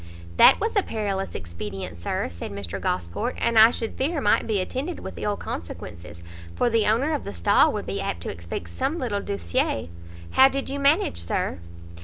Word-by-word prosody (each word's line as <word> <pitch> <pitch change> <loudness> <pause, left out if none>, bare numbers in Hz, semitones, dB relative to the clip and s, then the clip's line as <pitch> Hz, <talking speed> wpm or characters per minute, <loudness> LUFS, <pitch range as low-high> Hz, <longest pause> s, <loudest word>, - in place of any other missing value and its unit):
"That - - +8
was 445 +2 -1
a 405 - +5
perilous 200 - -3
expedient, 85 0 -6
Sir," - - -1
said 85 +3 -7
Mr 100 -1 -5
Gosport, 85 -1 -2
"and 230 -1 +3
I 220 +1 +10
should 230 -2 -4
fear 300 +4 0
might 210 -6 +2
be 215 -3 +1
attended 265 - -3
with - - -7
ill 205 -1 -1
consequences, 85 0 -7 0.3
for 240 - +1
the 225 -1 +3
owner 250 +9 +2
of 295 - -2
the 100 - -7
stall 85 0 +4
would - - -3
be - - -3
apt 85 - -3
to - - -4
expect 85 0 -7
some 275 - -1
little 215 -9 -2
douçeur. 85 - -1 0.4
How 265 - +7
did 275 0 -3
you 280 - -3
manage, 280 - +3
Sir?" 85 +1 -2
200 Hz, 190 wpm, -25 LUFS, -, 0.4 s, I